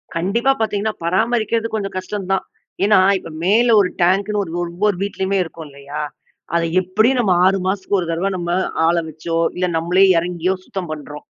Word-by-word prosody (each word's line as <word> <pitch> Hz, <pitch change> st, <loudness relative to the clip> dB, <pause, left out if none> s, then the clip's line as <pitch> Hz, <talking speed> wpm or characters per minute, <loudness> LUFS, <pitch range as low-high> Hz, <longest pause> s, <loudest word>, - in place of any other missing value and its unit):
கண்டிப்பா 200 Hz, +10 st, +1 dB
பார்த்தீங்கன்னா, 215 Hz, -1 st, -1 dB
பராமரிக்கிறது 225 Hz, +5 st, +1 dB
கொஞ்சம் 200 Hz, -3 st, -4 dB
கஷ்டம் 190 Hz, +1 st, -5 dB
தான். 190 Hz, -, 0 dB, 0.4 s
ஏன்னா, 210 Hz, -2 st, +5 dB, 0.2 s
இப்ப 165 Hz, -, -10 dB, 0.2 s
மேல 230 Hz, +5 st, +4 dB
ஒரு 180 Hz, -, 0 dB
டாங்க்னு 200 Hz, +4 st, +2 dB
ஒரு 165 Hz, -, -9 dB
ஒவ்வொரு 180 Hz, +4 st, 0 dB
வீட்டிலேயுமே 195 Hz, 0 st, -1 dB
இருக்கும், 165 Hz, -2 st, -10 dB
இல்லையா? 140 Hz, +2 st, -7 dB, 0.5 s
அதை 170 Hz, -, +2 dB, 0.2 s
எப்படியும் 215 Hz, +8 st, +2 dB
நம்ம 205 Hz, -6 st, +3 dB
6 190 Hz, +1 st, +4 dB
மாசத்துக்கு 195 Hz, 0 st, 0 dB
ஒரு 170 Hz, -, -3 dB
தடவை 180 Hz, +4 st, -1 dB
நம்ம 175 Hz, 0 st, -4 dB, 0.4 s
ஆள 170 Hz, -, +3 dB
வச்சோ, 165 Hz, +2 st, -4 dB, 0.2 s
இல்ல 180 Hz, 0 st, 0 dB
நம்மளே 175 Hz, +4 st, +3 dB
இறங்கியோ 175 Hz, +1 st, 0 dB
சுத்தம் 185 Hz, -4 st, -5 dB
பண்றோம். 150 Hz, -1 st, -8 dB
190 Hz, 165 wpm, -19 LUFS, 170-210 Hz, 0.5 s, ஏன்னா